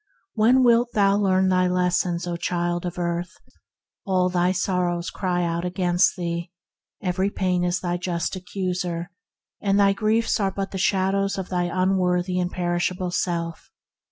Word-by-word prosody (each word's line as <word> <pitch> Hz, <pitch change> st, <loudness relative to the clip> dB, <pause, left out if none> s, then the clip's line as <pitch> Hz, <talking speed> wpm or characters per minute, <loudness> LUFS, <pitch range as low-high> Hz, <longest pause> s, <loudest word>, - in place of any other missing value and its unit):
When 240 Hz, +4 st, +4 dB
wilt 240 Hz, 0 st, +4 dB
thou 200 Hz, -1 st, +3 dB
learn 190 Hz, -2 st, +2 dB
thy 185 Hz, 0 st, +3 dB
lessons, 180 Hz, -1 st, 0 dB
O 175 Hz, -1 st, -3 dB
child 175 Hz, 0 st, -2 dB
of 175 Hz, -, -6 dB
earth! 175 Hz, 0 st, -3 dB, 0.7 s
All 185 Hz, -2 st, +1 dB
thy 180 Hz, 0 st, +2 dB
sor 180 Hz, -1 st, 0 dB
rows 175 Hz, 0 st, -3 dB
cry 180 Hz, -2 st, -1 dB
out 170 Hz, 0 st, -1 dB
against 180 Hz, 0 st, +2 dB
thee; 170 Hz, -1 st, -4 dB, 0.5 s
every 190 Hz, +1 st, 0 dB
pain 180 Hz, -3 st, 0 dB
is 180 Hz, +1 st, 0 dB
thy 175 Hz, -1 st, -1 dB
just 175 Hz, 0 st, -2 dB
accuser, 180 Hz, -1 st, -3 dB, 0.5 s
and 200 Hz, 0 st, +2 dB
thy 200 Hz, -1 st, +5 dB
griefs 220 Hz, +3 st, +1 dB
are 195 Hz, -2 st, +1 dB
but 195 Hz, 0 st, -4 dB
the 190 Hz, -, -4 dB
shadows 195 Hz, +1 st, +1 dB
of 190 Hz, -1 st, -4 dB
thy 180 Hz, -1 st, 0 dB
unworthy 180 Hz, 0 st, +1 dB
and 180 Hz, 0 st, 0 dB
perishable 175 Hz, 0 st, -1 dB
self. 170 Hz, -2 st, -2 dB
180 Hz, 155 wpm, -24 LUFS, 175-195 Hz, 0.7 s, thy